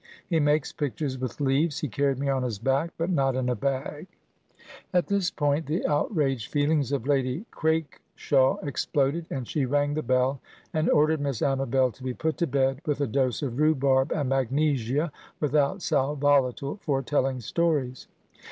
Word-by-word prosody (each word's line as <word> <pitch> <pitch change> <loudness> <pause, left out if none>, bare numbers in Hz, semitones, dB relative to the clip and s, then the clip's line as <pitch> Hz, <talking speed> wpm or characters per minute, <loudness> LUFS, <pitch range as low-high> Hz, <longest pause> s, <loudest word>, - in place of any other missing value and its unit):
He 165 -3 +1
makes 150 0 +2
pictures 145 -2 -3
with 130 +2 -5
leaves. 145 +4 +1
He 150 - -1
carried 140 +3 0
me 140 +1 -2
on 135 -1 +1
his 120 -4 -2
back, 135 +8 0
but 165 +3 -1
not 135 -5 +1
in 130 -1 0
a 125 - +1
bag"— 140 - -3 0.8
At 180 -1 +2
this 200 -3 +1
point 145 +1 0
the 155 +4 -1
outraged 145 - 0
feelings 145 -2 +1
of 140 -4 -1
Lady 135 - 0
Craikshaw 155 -3 0
exploded, 145 +3 -1
and 130 -4 -4
she 140 -4 -1
rang 145 +2 +1
the 155 - -1
bell, 130 +1 +1 0.3
and 155 +1 +1
ordered 155 0 +3
Miss 140 -5 -2
Amabel 135 -1 +1
to 130 - -15
be 130 -1 -3
put 160 -1 -2
to 170 - +1
bed 135 0 +1
with 145 -2 -1
a 145 - +1
dose 130 +2 0
of 130 -1 -3
rhubarb 140 -3 +3
and 140 -4 -1
magnesia 135 +2 0 0.3
(without 150 +5 +1
sal 145 -1 +1
volatile), 140 +1 +1
for 135 -3 0
telling 135 -1 0
stories. 135 0 -1
140 Hz, 170 wpm, -26 LUFS, 130-150 Hz, 0.8 s, ordered